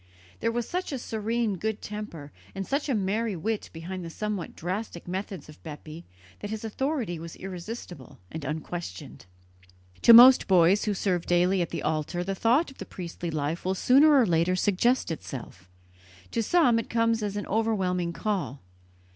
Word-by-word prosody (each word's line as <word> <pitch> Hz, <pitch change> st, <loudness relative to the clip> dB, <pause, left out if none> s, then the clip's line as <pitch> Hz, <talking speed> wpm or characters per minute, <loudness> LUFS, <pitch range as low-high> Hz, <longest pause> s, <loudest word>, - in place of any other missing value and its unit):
There 230 Hz, -, 0 dB
was 235 Hz, 0 st, -2 dB
such 360 Hz, -1 st, -3 dB
a 275 Hz, -, -2 dB
serene 225 Hz, -2 st, -2 dB
good 220 Hz, +1 st, -2 dB
temper 205 Hz, -9 st, -7 dB, 0.2 s
and 195 Hz, 0 st, -3 dB
such 285 Hz, +5 st, -1 dB
a 260 Hz, -, +2 dB
merry 210 Hz, +2 st, 0 dB
wit 215 Hz, +6 st, -3 dB
behind 175 Hz, +3 st, -6 dB
the 165 Hz, -, -6 dB
somewhat 210 Hz, 0 st, -4 dB
drastic 180 Hz, +1 st, -5 dB
methods 190 Hz, -2 st, -5 dB
of 155 Hz, -, -14 dB
Bepi 155 Hz, +1 st, -9 dB, 0.3 s
that 205 Hz, -, -6 dB
his 220 Hz, 0 st, -5 dB
authority 235 Hz, -, -2 dB
was 165 Hz, 0 st, -8 dB
irresistible 180 Hz, -, -8 dB
and 160 Hz, -, -6 dB
unquestioned. 150 Hz, -, -6 dB, 0.7 s
To -, -, +8 dB
most 245 Hz, +3 st, +9 dB
boys 185 Hz, +1 st, +4 dB
who 210 Hz, -2 st, 0 dB
serve 180 Hz, -3 st, -1 dB
daily 180 Hz, +2 st, +3 dB
at 170 Hz, -, -1 dB
the -, -, -4 dB
altar 155 Hz, +3 st, -1 dB
the 195 Hz, +2 st, -2 dB
thought 245 Hz, -, +2 dB
of 270 Hz, -, -18 dB
the 195 Hz, -, -6 dB
priestly 175 Hz, -1 st, -6 dB
life 155 Hz, +1 st, -2 dB
will 185 Hz, +1 st, 0 dB
sooner 280 Hz, +7 st, +6 dB
or 245 Hz, -, +5 dB
later 170 Hz, 0 st, +2 dB
suggest 205 Hz, +4 st, +1 dB
itself; 115 Hz, -, -8 dB, 0.6 s
to 230 Hz, -, 0 dB
some 245 Hz, -2 st, +4 dB
it -, -, -6 dB
comes 230 Hz, -1 st, +1 dB
as 205 Hz, -1 st, -3 dB
an 205 Hz, -, -3 dB
overwhelming 190 Hz, -5 st, 0 dB
call. 170 Hz, -, -3 dB
195 Hz, 170 wpm, -27 LUFS, 170-225 Hz, 0.7 s, most